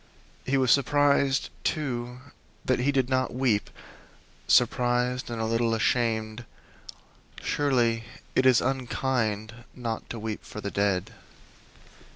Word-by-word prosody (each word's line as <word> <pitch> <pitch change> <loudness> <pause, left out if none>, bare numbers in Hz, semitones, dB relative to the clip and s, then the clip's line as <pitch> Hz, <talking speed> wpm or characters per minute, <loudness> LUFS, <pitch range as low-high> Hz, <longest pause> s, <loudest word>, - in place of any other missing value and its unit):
He 135 +1 +2
was 130 -3 +3
surprised, 140 -1 +3
too, 125 -5 -2 0.4
that 130 - +1
he 135 +3 +2
did 135 -3 +1
not 130 -1 0
weep 125 -6 +1 0.8
surprised 125 +1 +2
and 115 -1 -4
a 110 - -1
little 115 0 +1
ashamed; 110 -1 0 1.0
surely 120 -6 +1 0.3
it 130 - +3
is 125 -3 +5
unkind 125 -4 -1 0.2
not 115 -3 -5
to 115 - -5
weep 110 -1 -5
for - - -9
the 100 -1 -4
dead. 100 -3 0
120 Hz, 120 wpm, -27 LUFS, 110-130 Hz, 1.0 s, is